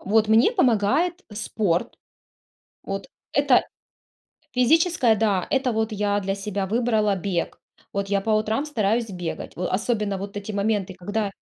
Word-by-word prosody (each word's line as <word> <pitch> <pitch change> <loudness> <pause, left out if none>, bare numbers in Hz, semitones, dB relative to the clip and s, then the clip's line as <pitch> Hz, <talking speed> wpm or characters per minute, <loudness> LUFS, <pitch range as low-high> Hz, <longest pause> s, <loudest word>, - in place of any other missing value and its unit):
Вот 215 +2 +2
мне 225 - +5
помогает 305 - +2
спорт. 205 -4 -1 0.9
Вот. - - -5 0.3
Это - - +4 0.9
физическое, 260 -1 +3
да, 205 -4 +1
это 265 -2 +1
вот 220 0 -1
я 205 -1 0
для 195 0 -2
себя 200 0 -3
выбрала 215 -1 +1
бег. 185 -2 -3 0.3
Вот 200 0 -2
я 200 -1 +1
по 220 +2 -1
утрам 215 +5 +1
стараюсь 225 -5 0
бегать. 180 -3 -5
В 180 - -2
особенно 210 0 -1
вот 200 +1 -7
эти 205 +1 -5
моменты, 200 -2 -1
когда 205 +2 -2
210 Hz, 140 wpm, -24 LUFS, 200-225 Hz, 0.9 s, мне